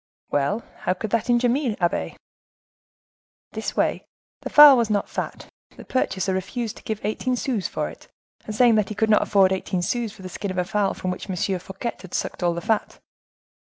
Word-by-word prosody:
"Well, 145 +11 0
how 185 - -1
could 210 +2 -5
that 230 +1 0
injure 240 +1 +3
me, 245 -3 0
abbe?" 175 0 -1 1.3
"This - - -5
way. - - +1 0.4
The - - -5
fowl 295 -2 +10
was 235 -3 +1
not 205 -1 0
fat. - - -5 0.3
The - - -11
purchaser 190 -7 -1
refused 220 +4 -3
to - - -14
give 220 -1 -3
eighteen 250 +4 -1
sous 240 -5 -1
for - - -3
it, - - -12 0.4
saying 230 +2 +4
that 200 - -7
he 215 - -5
could 220 +1 +1
not 210 - +5
afford 195 -2 +4
eighteen 185 -1 -2
sous 235 +3 -1
for 200 -2 -14
the - - -5
skin 200 +2 -5
of 185 - -4
a 180 - +1
fowl 200 +1 0
from 185 - -3
which 180 - -7
M. 185 - -2 0.2
Fouquet 190 +6 -6
had 190 - -8
sucked - - -3
all 175 -1 +1
the 170 - -4
fat." 220 +4 -1
210 Hz, 200 wpm, -23 LUFS, 185-235 Hz, 1.3 s, fowl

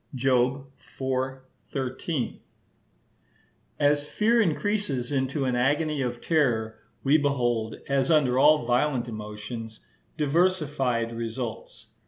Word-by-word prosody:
(Job 130 +1 +1 0.3
iv. 130 0 -1 0.3
13) 130 +1 -3 1.4
As 145 0 +3
fear 225 +9 +2
increases 165 - -1
into 135 0 0
an 125 -1 0
agony 145 +4 +1
of 120 -2 -2
terror, 115 -9 +1 0.2
we 145 +3 +4
behold, 120 -6 0
as 135 -1 +1
under 135 -6 +3
all 150 -2 +5
violent 125 +1 +1
emotions, 110 +1 -7 0.4
diversified 145 -7 +1
results. 115 -1 -6
130 Hz, 100 wpm, -26 LUFS, 120-150 Hz, 1.4 s, all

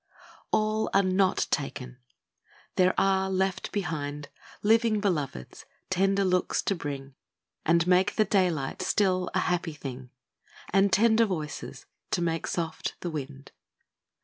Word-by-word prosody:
A - - +4
LL 215 0 0
are 195 - +5
not 185 0 +2
taken! 130 -3 -3 0.8
there 185 0 +3
are 190 0 +2
left 190 0 -1
behind 150 -7 -3 0.3
Living 225 0 +3
Beloveds, 150 - -3 0.2
tender 195 +1 +2
looks 180 -1 +1
to - - +1
bring, 140 -5 -6 0.5
And 170 +1 +4
make 185 +2 +3
the 215 - +3
daylight 175 -10 0
still 185 -3 +1
a - - +3
happy 175 -2 -1
thing, 130 -3 -8 0.6
And 195 0 +4
tender 225 +2 +4
voices, 155 -8 -5 0.2
to - - 0
make 165 -1 -1
soft 165 -2 -3
the 175 - -3
wind. 140 -2 -7
180 Hz, 130 wpm, -28 LUFS, 150-195 Hz, 0.8 s, are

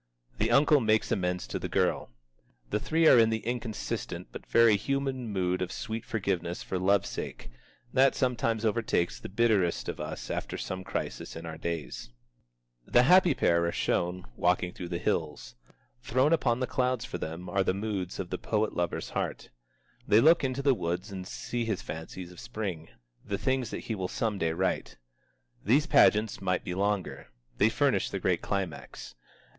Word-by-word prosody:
The 110 - +2
uncle 145 +4 +5
makes 110 -2 +2
amends 90 -1 0
to - - -4
the - - -4
girl. - - +1 0.6
The 105 - +1
three 160 +7 +2
are 125 - +8
in 115 -1 +5
the 110 -1 -2
inconsistent 120 -2 -4
but - - -9
very 115 -2 +5
human 135 +2 -2
mood 90 -2 0
of 90 - -2
sweet 115 0 -5
forgiveness 90 -5 -2
for 95 - -3
love's 100 +2 +3
sake, - - -6 0.4
that 135 +1 +4
sometimes 115 -3 0
overtakes 110 -6 0
the - - -8
bitterest 95 - +2
of - - -4
us 75 +1 -5
after - - -3
some 95 0 -4
crisis - - -4
in 80 +1 -7
our 80 -1 -7
days. 85 -7 -4 0.8
The 120 - +5
happy 180 +1 +6
pair 85 -6 +3
are - - 0
shown, 90 +1 -1
walking 90 +2 +1
through 90 - -6
the 85 0 -3
hills. 75 -4 -2 0.5
Thrown 130 +6 +2
upon 125 -6 +1
the - - +2
clouds 125 -1 0
for - - -5
them 80 +3 -5
are 95 +2 +1
the 95 - 0
moods 100 -3 -3
of 95 -2 -5
the - - -2
poet 110 -1 0
lover's 85 0 -2
heart. - - -3 0.6
They 105 +1 +6
look 160 +6 +5
into 135 +1 -1
the 140 -1 +5
woods 90 -1 -3
and 95 -1 -6
see 120 +4 -3
his 110 -4 -2
fancies 85 +3 -7
of 90 - -13
Spring, 100 -9 -5 0.3
the 100 - -3
things 130 +2 0
that - - -5
he 115 - -4
will 95 -3 -2
some 105 +1 -2
day 80 - +1
write. 95 +3 -1 0.7
These 135 +9 +3
pageants 110 -10 +4
might 90 -1 0
be 90 - -4
longer. 100 0 -1 0.3
They - - +5
furnish - - +1
the - - -3
great - - +1
climax. 95 -8 -4
105 Hz, 180 wpm, -29 LUFS, 90-120 Hz, 0.8 s, are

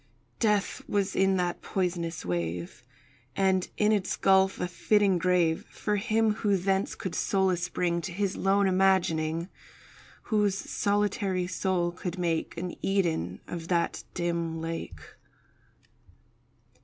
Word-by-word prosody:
Death 210 -3 +1
was 200 -1 0
in 190 0 +3
that 175 -1 -1
poisonous 170 - -2
wave, 85 +2 -3 0.5
And 190 -1 +2
in 210 0 +3
its 205 -3 +1
gulf 190 0 +3
a - - -1
fitting 195 +1 +2
grave 175 -2 +2
For 210 -1 -2
him 220 +1 +2
who 205 -3 +3
thence 190 +1 0
could 185 - -5
solace 185 -3 +1
bring 170 -1 0
To 185 - -5
his 195 +2 -1
lone 195 +1 +2
imagining— 175 -4 +2 0.8
Whose 210 -3 +1
solitary 200 -3 0
soul 180 -1 0
could 180 0 -5
make 170 -2 -1
An 180 +1 -4
Eden 165 - 0
of 165 -1 -6
that 170 -1 0
dim 170 -2 -1
lake. 165 0 -5
185 Hz, 125 wpm, -28 LUFS, 170-195 Hz, 0.8 s, in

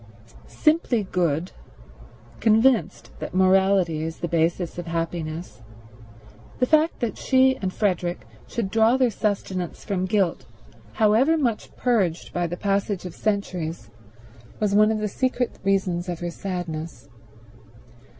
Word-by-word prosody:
Simply 305 -8 +1
good, 175 -2 -1 0.9
convinced 220 - +2
that - - -6
morality 190 -3 +3
is 160 0 -4
the 175 - -3
basis 170 +1 0
of 175 - -6
happiness, 165 -3 -4 1.0
the 250 - +2
fact 310 +3 +2
that 235 -3 -2
she 260 0 +4
and 190 -1 -3
Frederick 180 -3 -1 0.2
should 220 -5 -3
draw 225 +3 +4
their 255 -3 +3
sustenance 190 -5 -3
from 185 -2 -1
guilt, 185 -3 0 0.5
however 240 +8 +3
much 240 -8 -2
purged 200 -9 0
by 175 -1 0
the 175 +2 -5
passage 200 -1 -1
of 180 - -6
centuries, 175 - -3 0.7
was 210 -2 +1
one 210 +1 +5
of 220 - 0
the 215 0 -1
secret 250 +3 -1
reasons 190 -2 0
of 175 -2 -4
her 175 0 -3
sadness. 165 -8 -5
190 Hz, 130 wpm, -24 LUFS, 175-220 Hz, 1.0 s, one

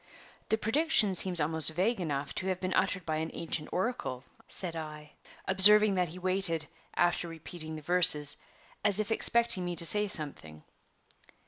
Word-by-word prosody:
"The 220 - 0
prediction 225 -2 0
seems 180 -1 +4
almost 160 0 +1
vague 190 +7 -2
enough 145 -4 -5
to 190 - -4
have 185 -1 -3
been 185 0 -4
uttered 185 -1 -2
by 155 -1 -3
an 160 +1 -5
ancient 160 -2 -5
oracle," 185 - -5 0.2
said 175 -3 -3
I, 150 -2 -10 0.4
observing 205 +2 +7
that 180 -3 -2
he 170 - -11
waited, 185 -3 0 0.3
after 175 0 -1
repeating 160 -1 -9
the 155 - -11
verses, 150 -4 +3 0.5
as 205 -1 +2
if 215 +1 -4
expecting 230 -4 +4
me 175 0 -5
to 170 - +2
say 210 +5 +2
something. 135 - -5
175 Hz, 160 wpm, -28 LUFS, 155-195 Hz, 0.5 s, observing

